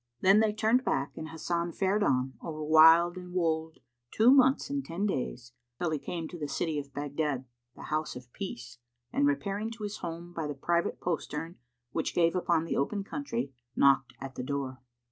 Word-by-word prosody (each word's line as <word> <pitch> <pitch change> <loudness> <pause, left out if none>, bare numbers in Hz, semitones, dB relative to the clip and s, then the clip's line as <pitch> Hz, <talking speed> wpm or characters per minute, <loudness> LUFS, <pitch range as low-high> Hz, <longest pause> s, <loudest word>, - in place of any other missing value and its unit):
Then 195 +3 +6
they 220 -1 +3
turned 220 +4 +2
back 140 - -1
and 155 - -6
Hasan 170 +1 -2
fared 195 +2 +1
on, 130 -7 +1
over 155 -2 -5
wild 160 +3 +7
and 180 -1 -8
wold, 160 -2 0 0.3
two 225 - +5
months 265 0 +5
and 280 0 -2
ten 175 +2 -3
days, 125 - -3 0.3
till 175 -2 -1
he 155 - -1
came 165 +2 -4
to 175 - -8
the 150 - -3
city 150 +2 -1
of 140 -1 -8
Baghdad, 145 -1 -2 0.3
the - - -10
House 155 0 -2
of 125 -1 -11
Peace, 125 -11 -7 0.3
and 285 +2 +3
repairing 215 -6 -1
to 225 -1 -8
his 205 0 -4
home 170 +1 -6
by 160 -3 -3
the 145 - -4
private 170 +5 0
postern 165 -1 -3 0.3
which - - -2
gave 170 0 +3
upon 170 -2 +1
the - - -2
open 200 +9 0
country, 235 - -4 0.2
knocked 135 -2 +4
at 135 -1 -7
the 125 - -5
door. 135 -1 -3
165 Hz, 190 wpm, -30 LUFS, 145-195 Hz, 0.3 s, wild